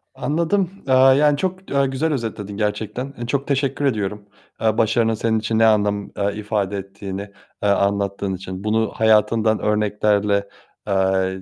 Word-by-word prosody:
Anladım. 170 +7 0 0.2
Eee, 130 - +2
yani 135 +3 +5
çok, 185 +3 -4
aaa, 140 0 +3
güzel 135 +4 -1
özetledin 105 -5 -4
gerçekten. 110 +5 -3
Eee, 120 - -5
çok 140 +2 -1
teşekkür 140 0 0
ediyorum. 105 -4 -1 0.4
Eee, 110 -1 +1
başarının 115 0 +2
senin 110 0 0
için 110 0 -1
ne 115 - +5
anlam, 105 -2 +1
eee, 100 0 -1
ifade 105 -2 -2
ettiğini, 100 0 -6 0.4
eee, 105 - +3
anlattığın 100 0 0
için. 95 +1 -7
Bunu 110 0 +1
hayatından 110 0 +3
örneklerle, 105 -1 +1 0.4
eee, 95 -1 +1
110 Hz, 145 wpm, -21 LUFS, 100-130 Hz, 0.4 s, yani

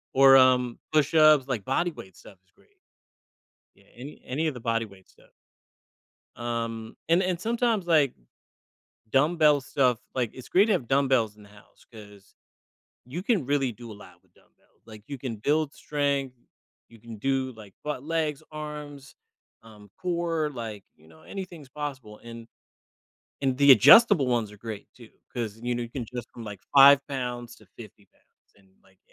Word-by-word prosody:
Or, 135 0 +8
um, 125 -2 +3
push-ups, 155 -2 +4
like 120 -7 -3
body 170 +7 0
weight 95 -10 -13
stuff 100 - -16
is 90 - -37
great. - - -29 1.1
Yeah, - - -24
any 135 +4 -10
any 155 +5 -2
of 150 - -2
the 125 - -10
body 115 0 -1
weight 100 -2 -18
stuff. - - -25 1.0
Um, 115 -1 -5
and 170 +3 +3
and 180 -2 -2
sometimes, 230 -3 0
like, 155 -6 +3 1.0
dumbbell 150 +1 +3
stuff, 125 -3 +1 0.2
like, 120 -4 -1
it's 130 - -12
great 195 +3 +4
to 215 - +1
have 130 -11 -2
dumbbells 130 -6 +1
in 105 - -16
the 100 - -18
house 105 0 -21
'cause 105 -3 -15 0.7
you 165 +9 -6
can 205 - 0
really 135 -3 0
do 115 0 -11
a - - -8
lot 90 -3 -16
with - - -36
dumbbells, - - -32
like, 110 -2 -13
you 140 -2 -6
can 120 -4 -6
build 150 +5 0
strength, 140 -3 -2 0.5
you 115 -1 -18
can 115 0 -11
do, 130 +2 -1
like, 105 -4 -14
butt, 150 -3 -4
legs, 155 -1 -2
arms, 150 -2 -9 0.5
um, 105 -2 -16
core, 170 -3 -2
like, 110 -5 -7
you 80 +1 -23
know, 80 0 -19
anything's 175 -8 -9
possible 130 -7 -7
and 115 -1 -10 1.0
and 130 -1 0
the 140 -1 +7
adjustable 140 - +7
ones 115 -4 -1
are 105 - -14
great 110 -1 -8
too 120 -3 -16 0.2
'cause, 110 -3 -5
you 120 0 -2
know, 120 - -3
you 120 - -6
can 125 +1 -5
adjust 120 +1 -8
from, 120 - -10
like, 105 -3 -8 0.2
5 140 0 +9
pounds 125 -3 -5
to 110 - -20
50 105 -3 -13
pounds - - -39
and, 95 -2 -26
like, 95 0 -27
130 Hz, 175 wpm, -26 LUFS, 115-150 Hz, 1.1 s, 5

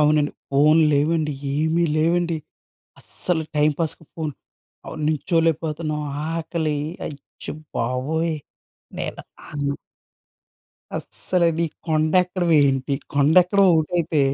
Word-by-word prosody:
అవునండి. 150 0 +3 0.2
ఫోన్లు 155 +3 +5
లేవండి. 150 +1 +1 0.2
ఏమీ 160 +3 +2
లేవండి. 170 +1 +2 0.6
అస్సలు 170 -3 -2
టైంపాస్‌కి 155 +2 0
ఫోన్ 155 -2 -3 0.5
అవును. 155 - -7
నిల్చోలేకపోతున్నాం 155 0 0 0.3
ఆకలి, 160 -2 -1 0.3
అచ్చ 145 -2 -12 0.3
బాబోయ్! 145 +7 0 0.6
నేను - - -3 0.3
అం 145 -1 -4 1.3
అస్సలు, 180 -2 -1 0.2
ఈ - - 0 0.2
కొండ 155 0 +1
ఎక్కడం 180 -1 -1
ఏంటి? 135 0 +1 0.2
కొండ 145 +2 +4
ఎక్కడం 200 +2 +3
ఒకటైతే, 160 -1 +1
155 Hz, 95 wpm, -22 LUFS, 150-165 Hz, 1.3 s, ఫోన్లు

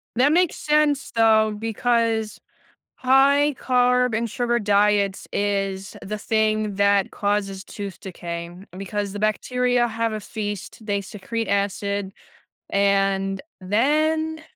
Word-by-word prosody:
That 260 +5 +4
makes 350 +1 +2
sense 300 -2 +1
though 220 -1 +3
because 225 0 0 0.6
high-carb-and-sugar 250 -3 +2
diets 205 -2 +1
is 195 -1 -2
the 210 +2 -5
thing 215 -1 0
that 200 -1 +2
causes 200 -2 -1
tooth 200 -3 -8
decay 170 -2 -6 0.3
because 200 +1 -4
the 205 - -6
bacteria 245 +3 +1
have 230 0 -2
a 215 - -3
feast, 205 0 -6
they 205 -2 -1
secrete 215 +3 -5
acid, 200 0 -1 0.6
and 195 -1 +1 0.2
then 310 +10 +1
215 Hz, 105 wpm, -23 LUFS, 200-245 Hz, 0.6 s, That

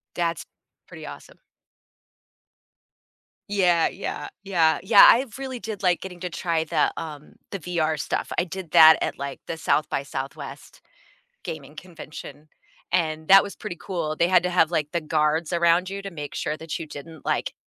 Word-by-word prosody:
That's 170 -1 -1 0.4
pretty - - -10
awesome. - - -11 2.1
Yeah, 180 -5 +3
yeah, 195 - -6 0.2
yeah, 165 -5 +2
yeah. 200 +1 +7
I 255 +4 +5
really 260 -2 -5
did 215 -3 -6
like 180 -2 +2
getting 180 -2 -9
to 180 -1 -4
try 165 -1 -1
the, - - +1
um 150 -2 -8 0.2
the 195 - -4
VR 160 -3 -1
stuff. 125 - -3
I 175 - +3
did 185 -1 -8
that 160 0 +9
at, - - -3
like, 140 -1 -6
the 165 - -4
SXSW 140 -3 -3 0.6
gaming 150 -1 -7
convention, 155 -2 -11 0.4
and 160 -3 0
that 195 0 +9
was 200 - -8
pretty 175 - -7
cool. 165 -5 -3
They 170 - +2
had 180 -1 +4
to 180 - 0
have, 175 -2 +3
like, 150 -3 -1
the 170 - -1
guards 155 +2 0
around 170 +2 +3
you 200 0 -5
to 195 - -7
make 150 -4 -7
sure 155 - -2
that 160 0 -5
you 165 - -5
didn't, 155 +1 -11
like, - - -1
170 Hz, 165 wpm, -24 LUFS, 155-185 Hz, 2.1 s, that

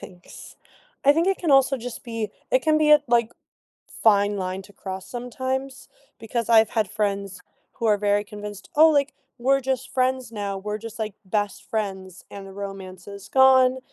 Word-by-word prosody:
Thanks. 180 -2 -13 0.5
I 285 - +7
think 330 +5 +1
it 390 - +1
can 335 - -1
also 270 0 +4
just 245 -1 -7
be 230 -3 -4 0.2
it - - +3
can 310 -1 +3
be 305 -1 +3
a, 300 0 +8
like, 235 -1 +2 0.7
fine 205 -1 +4
line 185 0 -4
to 205 - -17
cross 190 -1 -7
sometimes, 260 +2 -4 0.3
because 225 +1 -3
I've 225 -2 +5
had 215 -4 0
friends 200 -2 -2 0.3
who 230 - -3
are 210 -2 +3
very 205 0 +1
convinced, 205 -1 -9
"Oh, 315 +2 +8
like, 285 -2 +1 0.3
we're 270 +3 +2
just 265 -1 -3
friends 255 -2 0
now. 200 -2 -3
We're 210 +2 -4
just, 225 +1 -9
like, 215 -2 -3
best 205 +1 -3
friends 190 -4 -4
and 200 -1 -9
the 195 - -11
romance 190 -2 -8
is 200 -1 -10
gone," 260 -1 +5
220 Hz, 180 wpm, -24 LUFS, 200-260 Hz, 0.7 s, a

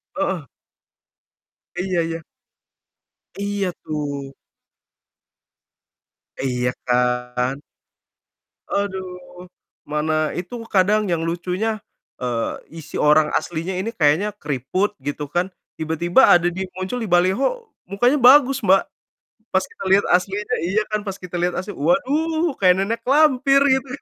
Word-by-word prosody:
Heeh. 190 - -2 1.3
Iya 180 0 -1
iya. 165 0 -3 1.2
Iya, 200 -1 -2
tuh. 145 -3 -4 2.1
Iya 125 -2 0 0.2
kan? 125 +1 0 1.1
Aduh, 185 -2 -5 0.4
mana 155 +1 0
itu 180 +7 -5
kadang 210 +1 +2
yang 170 -3 0
lucunya, 180 +6 -2 0.4
eee, 120 -2 -1 0.3
isi 155 - -11
orang 150 0 +4
aslinya 170 +2 -2
ini 225 +5 -4
kayaknya 175 +6 +2
keriput 150 - -2
gitu 145 +2 -4
kan, 175 +3 0 0.3
tiba-tiba 170 - +3
ada 175 0 +5
dia 190 +2 -4
muncul 185 +6 -3
di 225 - -3
baliho, 190 - +2 0.2
mukanya 245 +9 +2
bagus, 265 +1 +6
Mbak. 195 -5 +4 0.7
Pas - - +2
kita 450 - -11
lihat 195 +1 +5
aslinya 200 +6 -1
iya 195 +5 +1
kan, 215 -1 -2
pas 195 -2 -5
kita 180 -1 -8
lihat 175 +1 0
asli, 195 +3 -5
waduh! 315 +5 +1
Kayak 180 -2 +5
nenek 230 +3 -2
lampir 275 -1 +4
gitu. 265 0 +2
185 Hz, 115 wpm, -21 LUFS, 155-215 Hz, 2.1 s, bagus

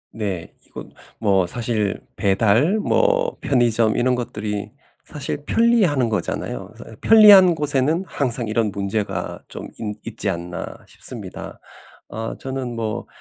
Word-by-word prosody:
네. 100 -6 -4
이거 - - -9 0.3
뭐 95 -4 +2
사실 110 -1 -2 0.2
배달 110 - +2
뭐 - - +1
편의점 115 -4 +2
이런 125 +1 +2
것들이 105 -3 -4 0.3
사실 145 0 -5
편리하는 205 - +3
거잖아요. 85 - -3
그래서 - - -12
어 - - -11
'편리한 205 -5 +8
곳에는 150 +3 0
항상 125 -6 -1
이런 110 -1 0
문제가 100 +1 -3
좀 - - -8
있 105 -2 -4
있지 105 -2 -3
않나.' 85 -1 -4 0.2
싶습니다. - - -6 0.5
어 115 +1 -5
저는 130 -2 -5
뭐 110 -2 -4
115 Hz, 265 characters per minute, -21 LUFS, 105-145 Hz, 0.5 s, 편리한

